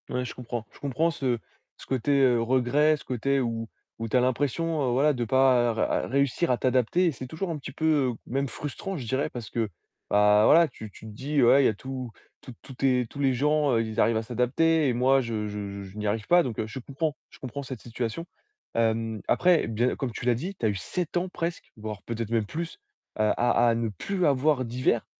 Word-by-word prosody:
Ouais 125 Hz, 0 st, -2 dB
je 120 Hz, -, -6 dB
comprends. 120 Hz, -2 st, -5 dB
Je -, -, -17 dB
comprends 145 Hz, +5 st, 0 dB
ce 130 Hz, -6 st, -1 dB, 0.4 s
ce -, -, -12 dB
côté, 130 Hz, +1 st, -1 dB
heu, 125 Hz, -3 st, +4 dB
regret, 130 Hz, +6 st, +3 dB
ce -, -, -14 dB
côté 135 Hz, +3 st, 0 dB
où 115 Hz, -2 st, -2 dB, 0.3 s
où 115 Hz, -, -3 dB
tu 130 Hz, -, +2 dB
as -, -, +5 dB
l'impression, 140 Hz, +2 st, 0 dB
voilà, 145 Hz, +4 st, +3 dB
de 120 Hz, -3 st, -2 dB
pas 120 Hz, -2 st, +2 dB
réussir 140 Hz, +5 st, +1 dB
à 125 Hz, -, +3 dB
t'adapter. 130 Hz, +9 st, +2 dB
C'est 130 Hz, -1 st, -8 dB
toujours 170 Hz, +6 st, -4 dB
un 160 Hz, -, -3 dB
petit 135 Hz, -, -8 dB
peu, 145 Hz, -4 st, +1 dB
même 135 Hz, +2 st, -1 dB
frustrant, 150 Hz, +8 st, -5 dB
je 130 Hz, -, -6 dB
dirais, 130 Hz, +4 st, 0 dB
parce 120 Hz, -3 st, -8 dB
que 115 Hz, -3 st, -1 dB, 0.4 s
voilà, 105 Hz, +11 st, +5 dB
tu 110 Hz, -7 st, -10 dB
tu 110 Hz, -, -14 dB
te 110 Hz, -, -8 dB
dis: 140 Hz, +6 st, -1 dB
«Ouais, 135 Hz, +4 st, +6 dB
il -, -, +3 dB
y -, -, +4 dB
a -, -, 0 dB
tous 130 Hz, +2 st, -6 dB, 0.3 s
tous 125 Hz, -, -10 dB
tous 135 Hz, -, -10 dB
tes 125 Hz, -1 st, +1 dB
tous 140 Hz, -, -11 dB
les 135 Hz, -2 st, +2 dB
gens, 145 Hz, -1 st, +2 dB
ils 115 Hz, 0 st, -2 dB
arrivent 115 Hz, 0 st, +3 dB
à 110 Hz, -, -1 dB
s'adapter 140 Hz, +7 st, +2 dB
et -, -, +1 dB
moi, 130 Hz, +3 st, +3 dB
je 110 Hz, -3 st, -3 dB
je 100 Hz, -1 st, -5 dB
je 95 Hz, +2 st, -11 dB
n'y 105 Hz, -, -2 dB
arrive 105 Hz, +1 st, -1 dB
pas». 175 Hz, 0 st, +6 dB
Donc 120 Hz, -5 st, -4 dB
je 110 Hz, +5 st, -7 dB
comprends, 145 Hz, +4 st, -3 dB
je -, -, -16 dB
comprends 135 Hz, +2 st, -6 dB
cette 130 Hz, -3 st, -7 dB
situation. 120 Hz, +6 st, -4 dB, 0.5 s
Hem, 115 Hz, -1 st, 0 dB
après, 180 Hz, -2 st, +3 dB
bien, 115 Hz, +3 st, 0 dB
comme 130 Hz, -3 st, -3 dB
tu 115 Hz, -, -7 dB
l'as 125 Hz, -, +4 dB
dit, 180 Hz, +12 st, -5 dB
tu 120 Hz, -, -3 dB
as -, -, +4 dB
eu 100 Hz, -, -1 dB
7 170 Hz, -, -4 dB
ans 180 Hz, +1 st, -1 dB
presque, 170 Hz, -1 st, -4 dB
voire 105 Hz, -1 st, -6 dB
peut-être 115 Hz, -1 st, -4 dB
même 115 Hz, -2 st, +1 dB
plus 165 Hz, -, -5 dB, 0.4 s
à 110 Hz, 0 st, +2 dB
à 120 Hz, 0 st, +3 dB
à 115 Hz, -, +2 dB
ne 115 Hz, -1 st, -1 dB
plus 180 Hz, -, -2 dB
avoir 140 Hz, -1 st, +2 dB
d'hivers. 120 Hz, -1 st, 0 dB
125 Hz, 220 wpm, -27 LUFS, 115-145 Hz, 0.5 s, Ouais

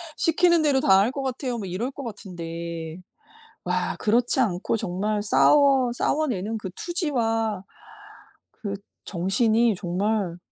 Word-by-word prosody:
시키는 340 Hz, +1 st, +3 dB
대로 290 Hz, -3 st, +3 dB
다 195 Hz, -6 st, +5 dB
할 215 Hz, +5 st, +2 dB
것 275 Hz, +1 st, -4 dB
같아요." 255 Hz, -2 st, -3 dB
뭐 210 Hz, -, -5 dB
이럴 215 Hz, +9 st, -3 dB
거 280 Hz, 0 st, -8 dB
같은데 170 Hz, -6 st, -6 dB, 0.7 s
와 -, -, -1 dB
그렇지 240 Hz, +4 st, +2 dB
않고 205 Hz, -2 st, 0 dB
정말 205 Hz, +2 st, -2 dB
싸워 270 Hz, +3 st, +4 dB
싸워 310 Hz, +5 st, 0 dB
내는 220 Hz, 0 st, -2 dB
그 190 Hz, -3 st, -6 dB
투지와 225 Hz, -, -1 dB, 0.9 s
그 200 Hz, -2 st, -5 dB, 0.3 s
정신이 215 Hz, +5 st, +2 dB
정말 185 Hz, 0 st, -1 dB
220 Hz, 240 characters per minute, -24 LUFS, 190-260 Hz, 0.9 s, 다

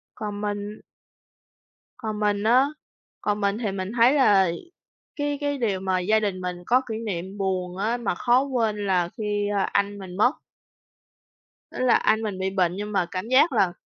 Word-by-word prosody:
Còn 205 Hz, -2 st, -5 dB
mình 205 Hz, 0 st, -4 dB, 1.2 s
Còn 220 Hz, -4 st, -4 dB
mình 205 Hz, -1 st, +1 dB
á, 250 Hz, +5 st, +5 dB, 0.6 s
còn 210 Hz, 0 st, -1 dB
mình 200 Hz, +1 st, +1 dB
thì 215 Hz, -4 st, -2 dB
mình 190 Hz, 0 st, -4 dB
thấy 240 Hz, +3 st, +6 dB
là 200 Hz, -11 st, +4 dB, 0.6 s
cái 290 Hz, -1 st, -2 dB
cái 285 Hz, -1 st, -1 dB
điều 205 Hz, -6 st, 0 dB
mà 185 Hz, -1 st, 0 dB
gia 215 Hz, +5 st, +2 dB
đình 200 Hz, -3 st, -2 dB
mình 180 Hz, -1 st, -3 dB
có 250 Hz, +2 st, +4 dB
kỷ 220 Hz, -, -3 dB
niệm 190 Hz, 0 st, -4 dB
buồn 185 Hz, -2 st, -2 dB
á, 220 Hz, +5 st, 0 dB
mà 225 Hz, -7 st, -2 dB
khó 245 Hz, +6 st, +3 dB
quên 220 Hz, -6 st, -1 dB
là 175 Hz, -2 st, +1 dB
khi, 205 Hz, -1 st, -1 dB
a, 195 Hz, -, +2 dB
anh 200 Hz, +1 st, 0 dB
mình 185 Hz, -1 st, -9 dB
mất. 245 Hz, +6 st, +4 dB, 1.4 s
Tức -, -, -9 dB
là 255 Hz, -2 st, +4 dB
anh 220 Hz, +1 st, +2 dB
mình 205 Hz, -4 st, -4 dB
bị 190 Hz, 0 st, 0 dB
bệnh, 185 Hz, -2 st, +1 dB
nhưng 205 Hz, +2 st, -5 dB
mà 195 Hz, -4 st, +1 dB
cảm 185 Hz, +3 st, -4 dB
giác 260 Hz, +6 st, +5 dB
là 190 Hz, -7 st, +2 dB
205 Hz, 185 wpm, -24 LUFS, 190-225 Hz, 1.4 s, thấy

